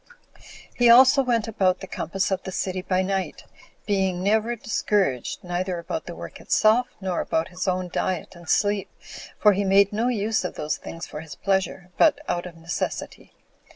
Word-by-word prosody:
He 240 -1 +4
also 260 +3 +8
went 235 -3 0
about 190 -4 +1
the - - -7
compass 190 +1 -2
of 190 -1 0
the 190 - -7
city 185 0 -2
by 185 0 0
night, 190 0 -3 0.4
being 190 -3 0
never 220 +4 +2
discouraged, 200 - -1
neither 180 0 -2
about 245 - -5
the - - -6
work - - -9
itself, 230 +4 +3
nor 190 -3 -2
about 160 +1 -1
his 180 0 -5
own 185 0 0
diet 180 0 -3
and 170 -2 -12
sleep, 205 -1 +1 0.5
for 210 -1 +5
he 200 +1 0
made 195 +1 +4
no 225 +3 0
use 220 -3 0
of 180 - -4
those 150 0 -2
things 165 +1 -8
for 150 - -8
his 160 -2 -10
pleasure, 190 -2 -1
but 315 -3 +5
out 175 +1 -2
of 170 -2 -12
necessity. 165 +1 -5
190 Hz, 180 wpm, -24 LUFS, 180-215 Hz, 0.5 s, also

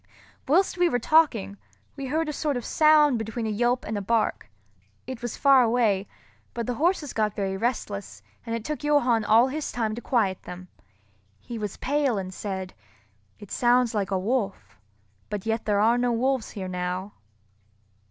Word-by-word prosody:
Whilst 355 +5 +2
we 355 -1 +4
were 245 - +1
talking, 240 -8 +2 0.4
we 275 -2 -5
heard 315 +4 0
a 300 - -3
sort 290 -3 -1
of 245 - -6
sound 300 -5 +4
between 225 +1 -4
a 220 - -1
yelp 240 +4 0
and 215 - -3
a 205 - -2
bark. 220 - 0 0.6
It 260 -1 -7
was 240 -2 -5
far 275 -2 +6
away; 225 -5 +2 0.5
but 235 -1 -2
the 245 - -2
horses 310 +2 0
got 215 -2 0
very 195 -1 -2
restless, 205 -2 -3 0.2
and 230 -1 -3
it 230 -1 -5
took 300 0 -4
Johann 255 -7 +3
all 225 +5 +5
his 305 +2 -4
time 225 -3 -1
to 235 - -6
quiet 205 -8 0
them. 180 0 -10 0.7
He 235 -2 -7
was 210 -2 -5
pale 280 -4 0
and 185 -1 -5
said, 190 -2 -5 0.6
"It 205 - -13
sounds 245 -1 +3
like 200 -3 -1
a 195 - 0
wolf—but 185 - -5
yet 225 0 -1
there 205 -1 +2
are 230 +3 +3
no 245 0 +1
wolves 255 +1 0
here 190 -3 -6
now." 180 +2 -4
230 Hz, 175 wpm, -25 LUFS, 200-260 Hz, 0.7 s, far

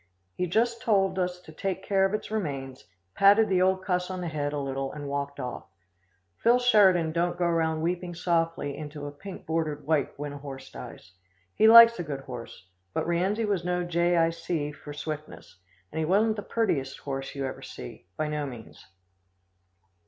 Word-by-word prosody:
He 180 - -2
just 230 +5 +1
told 195 -3 +2
us 180 0 -1
to 160 - -13
take 190 +3 -3
care 195 -1 +2
of 195 - -1
its 215 - -6
remains, 135 -11 -4 0.3
patted 205 - +5
the 185 -1 +3
old 190 0 +2
cuss 180 -1 0
on 185 -1 -4
the 175 - -3
head 145 -2 -2
a 145 - -3
little 135 -1 -3
and 145 -1 -7
walked 140 0 -3
off. 125 -2 -5 0.7
Phil 240 +2 +4
Sheridan 195 -9 +4
don't 175 +2 0
go 175 - +1
around 160 -2 +1
weeping 175 +1 -2
softly 165 -4 0
into 150 -1 -7
a 145 - -5
pink 185 +7 -10
bordered 155 -3 -2
wipe 150 -2 0
when 145 0 -5
a 145 - -8
horse 135 -2 -9
dies. - - -10 0.4
He 220 - +4
likes 230 0 +9
a - - -1
good 140 -4 -5
horse, 120 -7 -9 0.3
but - - 0
Rienzi 190 +6 0
was 200 -4 0
no 180 0 0
Jay 175 0 +1
Eye 165 0 +3
See 165 -3 -3
for 150 0 -11
swiftness, 150 -8 -7 0.3
and 160 - -4
he 160 - +1
wasn't 215 +6 +3
the 205 - -4
purtiest 150 -12 -1
horse 135 -1 -5
you 140 -1 -2
ever 130 - -5
see, - - -10
by 155 - -1
no 150 -1 -2
means." 120 -4 -11
165 Hz, 190 wpm, -27 LUFS, 145-190 Hz, 0.7 s, likes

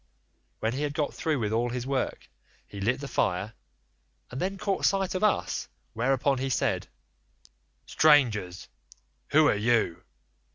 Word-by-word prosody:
When 110 +1 0
he 135 - -3
had 145 -1 -2
got 150 -2 -1
through 155 -2 -1
with 110 -4 -2
all 120 +2 +1
his 125 0 -4
work, 135 - -2 0.4
he 100 - -9
lit 120 +6 +1
the 140 - -5
fire, 100 -3 -1 0.8
and 125 - -5
then 195 +2 -2
caught 195 0 -2
sight 195 -1 +2
of 185 +2 -2
us, 210 - 0 0.3
whereon 135 +3 +1
he 135 +1 -2
said: - - 0 1.0
"'Strangers, 110 - +3 0.6
who 155 0 +5
are - - +4
you? 110 -4 +1
130 Hz, 150 wpm, -27 LUFS, 110-150 Hz, 1.0 s, who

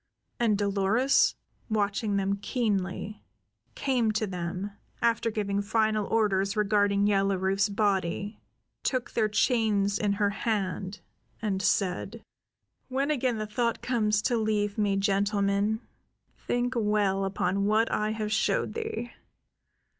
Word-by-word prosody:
And 225 -4 +3
Dolores, 205 +6 +2 0.3
watching 205 -1 0
them 195 0 0
keenly, 205 -2 -2 0.5
came 245 -5 +1
to 215 +1 0
them, 185 +1 -4 0.3
after 230 0 +1
giving 200 -2 -1
final 215 0 +1
orders 200 -2 +1
regarding 205 -1 +2
Yellow 195 -1 +2
Rufe's 195 +2 +1
body, 200 0 -1 0.4
took 255 -2 -1
their 215 -2 +1
chains 210 -3 +2
in 205 -1 +1
her 200 0 +1
hand, 200 -2 -2 0.4
and 200 -4 -1
said: 200 +3 0 0.6
"When 275 +3 0
again 255 -5 0
the 215 - -2
thought 230 +2 -1
comes 215 -4 +1
to 240 -1 +1
leave 210 -2 0
me, 205 -2 +1
gentlemen, 200 +2 +1 0.7
think 245 +1 0
well 210 -3 +1
upon 195 0 0
what 220 +2 +2
I 215 0 0
have 215 -1 -3
showed - - +1
thee. 445 - -4
210 Hz, 125 wpm, -28 LUFS, 200-225 Hz, 0.7 s, And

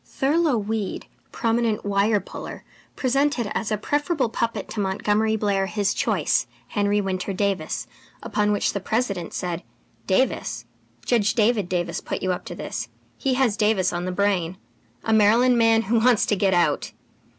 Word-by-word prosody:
Thurlow 295 -1 +1
Weed, 215 -1 -3 0.3
prominent 230 -2 0
"wire 205 +1 +2
puller," - - -8 0.3
presented 265 -3 0
as 220 - -2
a 215 - +1
preferable 290 - 0
puppet 230 +1 -2
to 220 - -5
Montgomery 210 +3 +1
Blair 200 -2 0
his 205 0 0
choice, 195 - +1 0.2
Henry 205 0 +1
Winter 190 0 -2
Davis, 190 -5 -1 0.4
upon 210 0 0
which 205 - +1
the 200 - -1
President 200 -4 -2
said: 175 -2 -3 0.5
"Davis? 260 +8 0 0.4
Judge 215 -4 +2
David 215 -5 +2
Davis 175 -1 -2
put - - -4
you 185 - +1
up 180 - -4
to - - -7
this. - - -5 0.3
He 265 -2 +1
has 250 -5 +2
Davis 210 -4 +2
on 175 +1 -2
the 185 - -2
brain. 185 -2 0 0.5
A 225 - +1
Maryland 235 +4 +5
man 225 0 +4
who 230 +3 +2
wants 235 -1 +4
to 210 - +1
get 190 -1 +2
out! 160 -4 +1
210 Hz, 160 wpm, -24 LUFS, 195-230 Hz, 0.5 s, Maryland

